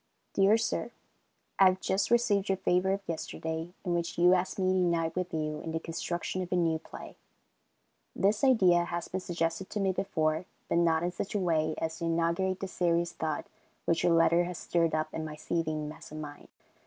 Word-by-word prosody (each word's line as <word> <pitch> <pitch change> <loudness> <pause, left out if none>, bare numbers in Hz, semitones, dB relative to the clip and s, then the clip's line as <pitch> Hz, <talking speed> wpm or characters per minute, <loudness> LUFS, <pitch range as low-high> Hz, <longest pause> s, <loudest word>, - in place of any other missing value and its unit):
Dear 200 +3 +5
Sir: 230 - -1 0.7
I 195 - +8
have 185 0 +4
just 190 +1 0
received 225 -4 +2
your 195 - +2
favor 180 0 +1
of 195 +1 -1
yesterday, 160 0 -4
in 175 - 0
which 170 -1 -2
you 175 +1 +6
ask 185 0 0
me 185 -1 +2
to 185 - +2
unite 170 -2 +1
with 180 -1 -2
you 155 -1 -2
in 160 - -5
the 160 - 0
construction 175 +3 -3
of 180 - -6
a - - +2
new 165 -2 +2
play. - - -10 1.0
This 205 +4 +1
idea 185 -10 +5
has 170 0 -4
been 185 - -3
suggested 170 +1 -2
to 210 - -3
me 195 -1 +2
before, 160 -3 0 0.2
but 170 - +2
not 165 -1 +3
in 175 - 0
such 190 +3 -5
a - - +2
way 160 -4 +1
as 160 0 -3
to 170 - -2
inaugurate 170 +3 0
the 195 - -2
serious 170 -2 +1
thought 160 -1 -3 0.4
which 165 0 +2
your 175 - +3
letter 165 +1 +4
has 180 -1 -5
stirred 165 -2 +1
up 155 0 -2
in 160 - -3
my 155 -1 -6
seething 155 -1 -2
mass 150 - -10
of 155 - -7
mind. 145 -1 -8
170 Hz, 205 wpm, -30 LUFS, 160-185 Hz, 1.0 s, I